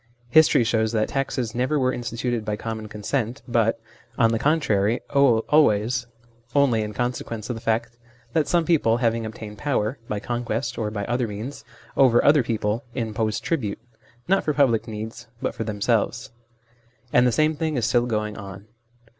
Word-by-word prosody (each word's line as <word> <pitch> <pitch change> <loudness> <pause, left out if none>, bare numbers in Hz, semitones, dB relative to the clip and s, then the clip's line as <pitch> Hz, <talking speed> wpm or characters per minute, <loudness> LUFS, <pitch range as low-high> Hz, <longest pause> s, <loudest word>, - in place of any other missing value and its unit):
History 155 -4 +6
shows 110 -1 +1
that 110 -1 +1
taxes 130 -4 -2
never 130 +5 0
were 130 -2 +1
instituted 120 -1 -3
by 105 -1 -2
common 110 0 -5
consent, 115 +4 -3
but, 115 -1 +1 0.4
on 115 -2 +4
the 115 - 0
contrary, 115 -8 +2
always 120 -3 +3 0.5
only 135 -6 +4
in 105 0 -3
consequence 120 -1 -3
of - - -3
the 115 - -8
fact 115 +1 -1 0.3
that 155 -3 +2
some 170 -2 +2
people 140 -10 +3
having 115 -2 0
obtained 110 -1 -9
power 130 -4 -1
(by 105 - -1
conquest 120 +2 -3
or 110 -2 -1
by 105 -1 -4
other 120 0 0
means) 110 +7 -6 0.3
over 130 -4 +5
other 145 0 +6
people, 110 0 -1
imposed 110 -3 -2
tribute, 120 -12 -1 0.5
not 195 +2 +3
for 150 - -1
public 125 -6 +3
needs, 110 +2 -7
but - - -2
for - - -4
themselves. 110 +2 -1 0.8
And 125 +1 +5
the - - +3
same 155 +5 +2
thing 155 -1 -1
is 120 - +1
still 120 +2 +2
going 105 -2 -2
on. 100 0 -9
115 Hz, 165 wpm, -24 LUFS, 110-130 Hz, 0.8 s, History